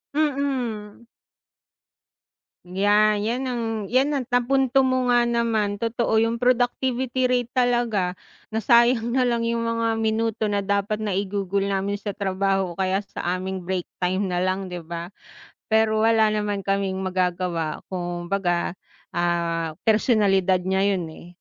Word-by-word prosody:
Mm. 260 -8 -2 1.6
Yan, 205 +3 +3
'yan 235 +5 -1
ang 245 -2 -2 0.3
'yan 275 +4 +2
ang 270 - -1
napunto 265 +1 +3
mo 255 -1 +1
nga 240 0 +4
naman, 225 -3 0
totoo, 230 +1 -1
'yung 230 +1 +2
productivity 255 +1 +1
rate 245 -1 0
talaga, 240 -7 +1 0.4
nasayang 235 +1 +4
na 255 0 +2
lang 235 -1 0
'yung 230 0 0
mga 230 -1 0
minuto 220 0 0
na 205 -1 0
dapat 200 +2 -1
naigugol 200 0 -1
namin 200 +1 -1
sa 205 -1 -5
trabaho, 195 -1 0
o 170 - -12
kaya 190 +2 0
sa 180 -2 -3
aming 185 -1 -5
break 185 -2 -1 0.2
time 185 +1 0
na 175 - 0
lang 185 +1 -1
'di 180 - -4
ba? 170 +2 -7 0.6
Pero 220 0 +3
wala 225 -1 +4
naman 205 -2 -2
kaming 195 -1 0
magagawa 180 -4 -2
kumbaga, 175 0 -2 0.4
ah, 170 -2 -1
personalidad 200 -4 +3
niya 190 0 +1
'yun, 195 -4 +1
eh, 160 +1 -11
205 Hz, 135 wpm, -23 LUFS, 190-235 Hz, 1.6 s, nga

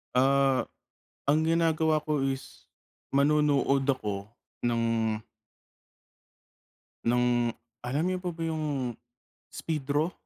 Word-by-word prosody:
ah, 135 +1 +4 0.6
ang 150 +3 +3
ginagawa 160 -1 +2
ko 150 -3 0
is 135 0 -4 0.4
manonood 140 -1 +3
ako 105 -6 -1 0.3
ng 120 -1 +1 2.3
ng 120 0 +2 0.3
alam 140 +6 0
niyo 185 0 0
po 180 -1 -2
ba 165 0 -4
yung 145 -7 -2 0.5
speedro? 150 +2 -1
140 Hz, 90 wpm, -28 LUFS, 130-155 Hz, 2.3 s, ah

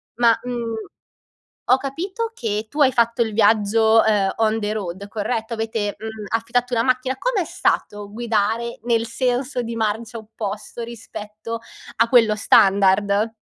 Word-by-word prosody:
Ma, 235 -1 +4
mhmm, 240 -2 -3 1.0
ho 255 - +7
capito 360 - -4
che 220 - -3
tu 300 - -4
hai 265 -2 +5
fatto 235 0 +1
il 220 -2 +1
viaggio, 220 +1 +4
ehm, 205 -3 +2
on 220 0 +1
the 210 -1 -2
road, 200 -2 -5
corretto? 220 +2 -3
Avete, 220 -2 -2
mhmm, 220 -1 -7
affittato 235 +2 0
una 230 -1 +2
macchina. 255 +1 0
Com'è 455 - 0
stato 205 -9 -1
guidare 225 +1 -1
nel 230 -1 +1
senso 250 +2 -1
di 230 -1 -4
marcia 220 +1 -2
opposto 220 0 -6
rispetto 225 -1 -7 0.4
a 230 +1 +3
quello 230 -3 +5
standard? 200 +2 +3
225 Hz, 145 wpm, -21 LUFS, 210-240 Hz, 1.0 s, ho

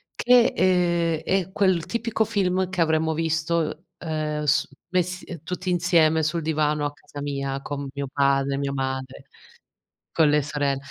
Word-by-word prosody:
che, 245 -1 +4
ehm, 170 -3 +2
è 190 0 0
quel 185 -5 +2
tipico 230 -1 -1
film 190 -4 0
che 185 -1 -5
avremmo 160 0 +2
visto, 160 +1 -1
ehm, 155 -2 -3
su 140 - +2 0.2
messi, 180 0 -1
ehm, 170 -4 -8
tutti 180 +2 -4
insieme 165 -3 +3
sul 165 +2 0
divano 150 -1 0
a 145 - -3
casa 145 0 -11
mia 140 -1 -3
con 140 -1 -5
mio 140 -1 -4
padre, 140 -1 +1
mio 140 0 -2
madre, 130 0 -4 0.9
con 160 -2 +4
le 150 0 +3
sorell 145 -2 -1
160 Hz, 155 wpm, -24 LUFS, 145-180 Hz, 0.9 s, che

